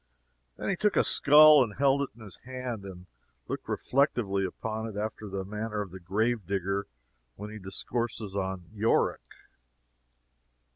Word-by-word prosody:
Then - - -5
he 195 - +1
took 210 +3 +1
a - - +4
skull 150 0 +7
and 105 -4 -6
held 140 0 +3
it 140 - -2
in 120 - -16
his 100 - -9
hand, 125 -5 -6
and 90 -2 -10 0.4
looked - - -5
reflectively 120 -8 +1
upon 110 +4 -4
it, 105 -2 -7
after 110 0 -4
the 95 0 -4
manner 105 +1 -4
of 100 -4 -6
the 95 - -9
grave 105 +4 -1
digger 100 0 -1 0.5
when 105 +1 -8
he 110 - -8
discourses 105 +1 -4
of 95 -1 -2
Yorick. 110 +2 +1
110 Hz, 155 wpm, -29 LUFS, 95-120 Hz, 0.5 s, skull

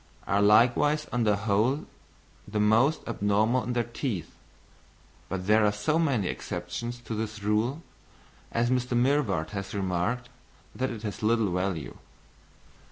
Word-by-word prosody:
are 100 - +1
likewise 120 +8 +4
on 120 -2 +1
the 105 -1 +4
whole 115 +8 +1 0.6
the 105 0 -2
most 115 +8 +3
abnormal 110 +2 +1
in 125 - -3
their 120 -1 +1
teeth, 120 - -4 1.0
but 90 -1 -3
there 105 +2 +4
are 105 - +4
so 105 +10 0
many 135 - +1
exceptions 105 +11 -4
to 120 -1 -7
this 105 -1 -4
rule, 115 +9 0 0.7
as 120 +1 +1
Mr. 125 -1 0
Mivart 120 - +1
has 100 0 -5
remarked, 100 +6 -1 0.5
that 130 +1 -1
it 115 -3 -7
has 105 -4 -5
little 110 -2 +2
value. 90 -4 -3
110 Hz, 140 wpm, -28 LUFS, 100-125 Hz, 1.0 s, likewise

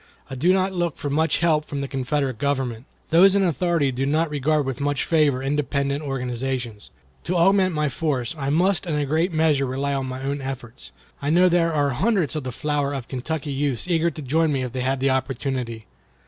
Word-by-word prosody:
I - - -4
do 150 +8 +2
not 190 0 +1
look 175 -4 -1
for 145 - -4
much 160 +2 +1
help 155 -3 +2
from 140 -2 -4
the 140 - -3
Confederate 135 -2 -2
Government. 130 -4 -1 0.3
Those 190 +4 +6
in 200 - +3
authority 170 -4 +1
do 130 +2 -2
not 155 +2 +1
regard 150 +1 +1
with 135 -1 -4
much 145 -1 0
favor 145 -5 +2
independent 140 0 -1
organizations. 125 -4 -4 0.4
To 180 - -1
augment 185 0 +3
my 150 0 +1
force, 140 -2 -2
I 140 -3 -3
must 180 +5 +2
in 160 - -1
a 145 -1 0
great 160 +6 +1
measure 155 -4 +2
rely 140 +2 -2
on 135 -1 -2
my 130 +1 -6
own 140 +1 -2
efforts. 120 - -7 0.3
I 140 - -1
know 180 +3 +5
there 170 -1 +2
are 145 -2 +1
hundreds 180 - +1
of 155 - -2
the 130 - -4
flower 145 +2 -1
of 130 -4 -6
Kentucky 145 +3 -4
youths 140 -1 -1
eager 170 -1 +2
to 155 -2 -8
join 160 +4 +1
me 135 -2 0
if 125 - -4
they 130 +1 -3
had 130 +1 -1
the 135 0 +3
opportunity. 130 -3 -2
145 Hz, 210 wpm, -23 LUFS, 130-160 Hz, 0.4 s, Those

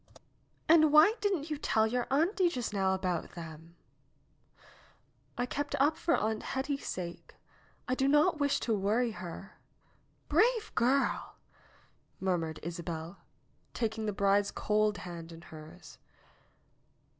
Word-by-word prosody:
"And 310 -2 +6
why 310 +8 +7
didn't 355 -7 -1
you 300 - -2
tell 220 -6 +2
your 245 +2 -1
auntie 345 +6 +2
just 245 -9 -4
now 190 -1 +1
about 180 -3 -3
them 165 0 -10 0.8
?" - - -28
"I 245 - 0
kept 290 +3 -3
up 295 +3 +3
for 335 - +1
Aunt 220 0 -1
Hetty's 275 +1 -3
sake. 175 -2 -6 0.5
I 255 - 0
did 270 +1 +1
not 300 +3 +3
wish 285 -1 +2
to 230 - 0
worry 215 +4 +1
her." 185 +1 -9 0.7
"Brave 455 -2 +2
girl!" 265 +3 +1 0.8
murmured 165 -5 -1
Isabel, 170 +1 -6 0.6
taking 220 -1 -2
the - - +1
bride's 200 0 +2
cold 210 -1 +1
hand 170 -2 -8
in 165 0 -11
hers. 160 +2 -13
220 Hz, 130 wpm, -31 LUFS, 180-285 Hz, 0.8 s, why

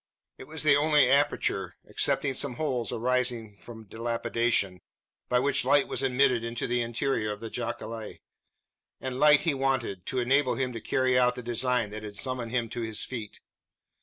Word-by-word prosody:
It - - -9
was 155 0 -3
the 145 -2 +6
only 150 -2 +4
aperture, 140 +3 +1
excepting 135 -2 0
some 130 -1 +1
holes 125 -5 -2
arising 120 -3 -1
from 110 -2 -11
dilapidation, 115 -3 -1 0.5
by 125 - +3
which 135 +2 +2
light 145 -1 +3
was - - -2
admitted 130 -2 +2
into 115 0 -3
the 120 0 0
interior 115 -1 -1
of 105 - -6
the 115 0 -7
jacale; 110 -1 -5 0.8
and 130 -1 -5
light 150 0 +6
he 165 - +1
wanted, 130 -9 -1
to 130 - -1
enable 130 +1 +2
him 130 -1 -2
to 115 - -6
carry 130 +1 +2
out 125 0 +3
the 125 - -7
design 120 -2 0
that 110 0 -6
had 105 -1 -8
summoned 130 -2 -2
him 120 -1 -1
to 120 - -5
his 110 -1 -1
feet. 115 -5 -7
125 Hz, 175 wpm, -28 LUFS, 115-135 Hz, 0.8 s, the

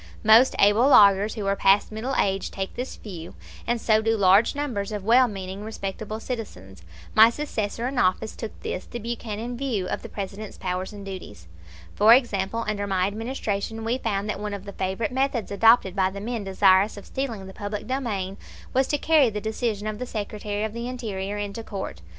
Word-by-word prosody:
Most 225 +4 +6
able 205 +6 +5
lawyers 205 -3 +6
who 210 -3 -4
are 195 0 +1
past 195 +2 +3
middle 235 +5 -3
age 195 0 0
take 190 -1 -5
this 250 +2 -5
view, 175 -6 -9 0.3
and 240 0 +1
so 220 -1 +3
do 225 0 +1
large 200 +5 +4
numbers 235 -9 -3
of 210 -2 -4
well 245 +4 +5
meaning, 195 -1 -6
respectable 215 0 -5
citizens. 95 - -7 0.3
My 220 +1 +8
successor 235 -4 -3
in 260 -1 -2
office 200 +2 +1
took 225 - -7
this, 185 - -4
the - - -7
Buchanan, 235 0 -5
view 240 -8 -2
of - - -3
the - - -9
President's 200 +1 -6
powers 185 +1 -3
and 205 -1 -9
duties. 180 - -8 0.5
For 220 +3 +7
example, 230 -3 -1
under 205 -1 -2
my 185 -2 +1
Administration 220 0 -3
we 235 +3 -1
found 205 -3 -2
that 210 - -3
one 210 -1 -3
of 200 0 -9
the 200 - -8
favorite 190 +5 -2
methods 260 -5 -1
adopted 200 -2 +4
by 190 -1 +2
the 200 +1 -7
men 225 0 -4
desirous 195 +2 +4
of 200 - -10
stealing 235 -8 -4
the 190 - -10
public 205 0 -5
domain 210 -8 -3 0.4
was 265 +1 +2
to 295 - 0
carry 300 -4 +4
the 210 -1 -4
decision 220 -1 -2
of 215 0 -4
the 250 - -4
Secretary 210 -1 -4
of 220 -1 -3
the 235 +1 -4
Interior 210 -5 -4
into 205 +2 -5
court. 195 - -6
210 Hz, 195 wpm, -25 LUFS, 195-230 Hz, 0.5 s, My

